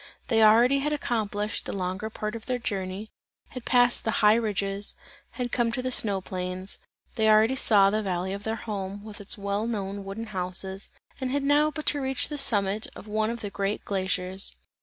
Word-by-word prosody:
They 225 -2 +4
already 235 +5 +6
had 300 +2 0
accomplished 215 -6 -2
the - - -3
longer 190 +3 -3
part 215 0 -4
of 225 - -8
their 250 -1 0
journey, 200 -2 -4 0.4
had 255 -2 -8
passed 245 -1 +4
the - - -1 0.2
high 210 - +8
ridges, 205 -3 -1 0.4
had 245 -1 -3
come 235 -2 +1
to 255 - -1
the 255 - -1
snow 200 -5 +2
plains, 185 +1 -4 0.4
they 220 -1 +3
already 215 +4 +5
saw 200 -6 +5
the 215 +1 +1
valley 190 -1 -2
of 200 - -5
their 220 +2 -2
home, 205 -3 -5
with 215 -1 -9
its 205 - +1
well 200 +2 -2
known 200 -3 -3
wooden 200 +4 -5
houses, 190 +1 -2 0.3
and 260 -1 -2
had 280 +2 0
now 290 +2 +4
but 305 0 -6
to 290 - +2
reach 265 +1 +2
the 295 -1 -2
summit 205 -5 +2
of - - -10
one 215 +1 0
of 235 0 -4
the 205 - -5
great 200 +1 -2
glaciers. 190 -1 -2
215 Hz, 200 wpm, -27 LUFS, 195-235 Hz, 0.4 s, high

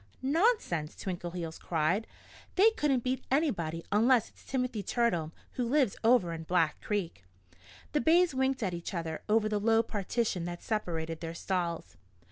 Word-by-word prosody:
"Nonsense!" 285 - +1
Twinkleheels 175 -3 -5
cried. 175 +7 0 0.5
"They 420 +4 +6
couldn't 280 - +1
beat 255 +1 -1
anybody 175 - 0
unless 230 +3 +4
it's - - -21
Timothy 250 -4 -2
Turtle, 190 -7 0 0.2
who 250 - -2
lives 270 -6 +3
over 225 -7 +4
in 165 - -5
Black 165 -2 +1
Creek." 190 - -3 0.7
The 300 - +1
bays 340 0 +4
winked 265 -1 0
at 185 -3 -1
each 170 +3 -5
other 165 -2 -3
over 215 0 +3
the 210 -1 0
low 225 +2 +3
partition 210 -3 -1
that 175 0 -6
separated 165 -7 -2
their 165 -1 -5
stalls. 170 - -3
205 Hz, 150 wpm, -30 LUFS, 170-255 Hz, 0.7 s, They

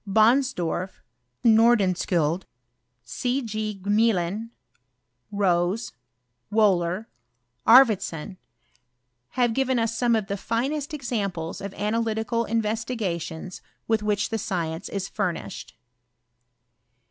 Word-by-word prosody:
Bonsdorf, 215 -5 +2 0.4
Nordenskiiild, 190 -7 +3 0.6
C. 245 - -1
G. 215 -2 -4
Gmelin, 210 0 +1 0.8
Rose, 190 +1 +1 0.6
Wbhler, 195 -2 +2 0.6
Arfvedsou, 205 - +5 1.0
have 245 -2 +3
^ivea 260 +1 +1
us 230 0 -2
some 235 0 +2
of 220 -2 0
the 200 +1 -3
finest 275 +8 -2
examples 200 - -3
of 200 0 -5
analytical 225 +2 -1
MveEtigations 210 -6 -3 0.3
with 225 -1 +2
which 210 -1 0
the 225 - -2
science 170 -2 -3
is 195 -1 -3
furnished. 170 -11 -4
210 Hz, 90 wpm, -25 LUFS, 185-230 Hz, 1.0 s, Arfvedsou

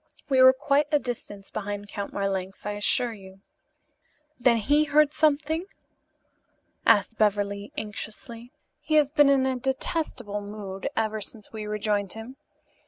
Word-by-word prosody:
We 265 -2 +4
were 260 0 +10
quite 280 +2 +1
a 295 - +5
distance 230 -6 -6
behind 205 -1 -5
Count 200 0 -5
Marlanx, 195 -1 -3
I 210 - -1
assure 225 +3 +2
you." 190 -2 -14 1.0
"Then 240 -1 +4
he 290 +8 +3
heard 300 0 +3
something?" 310 +3 +1 1.2
asked 215 0 +3
Beverly 205 -1 0
anxiously. 225 +3 -7 0.3
"He 310 - -1
has 295 -2 +4
been 290 -2 +5
in 270 -1 +4
a 260 -1 0
detestable 260 -5 -2
mood 200 -1 -6
ever 220 -1 0
since 210 +1 -7
we 215 -1 -5
rejoined 210 -2 -1
him. 225 +4 -9
225 Hz, 140 wpm, -26 LUFS, 205-275 Hz, 1.2 s, were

